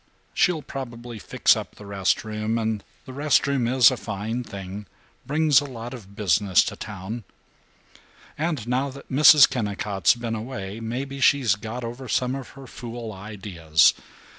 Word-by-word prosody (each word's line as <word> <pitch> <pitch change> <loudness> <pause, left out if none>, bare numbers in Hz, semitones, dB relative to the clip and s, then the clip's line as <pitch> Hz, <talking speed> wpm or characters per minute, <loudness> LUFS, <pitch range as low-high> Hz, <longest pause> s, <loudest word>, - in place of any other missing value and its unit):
She'll 170 -5 +2
probably 120 -4 -7
fix - - +3
up - - -7
the 105 - -12
rest 100 -1 0
room, 110 +1 -2
and 110 -2 -2 0.2
the 130 - -9
rest 145 +2 +2
room 140 -4 0
is 125 +1 +6
a 130 - -3
fine 110 +3 -4
thing, 100 -1 -8 0.4
brings 150 -1 +4
a - - -5
lot 120 -2 -7
of 100 -5 -11
business 100 -1 +3
to - - -4
town. 105 +3 -7 1.1
And 155 -7 -2
now 130 +3 0
that 140 +1 -12
Mrs. 150 +1 +8
Kennicott's 105 -6 0
been 120 -1 -4
away, 110 -3 -5
maybe 130 +5 -4
she's 130 -5 +4
got 110 +5 -6
over 120 +3 -6
some 125 +3 0
of 135 -2 -6
her 135 - -10
fool 120 -2 -7
ideas. 95 -6 +2
115 Hz, 160 wpm, -24 LUFS, 105-130 Hz, 1.1 s, Mrs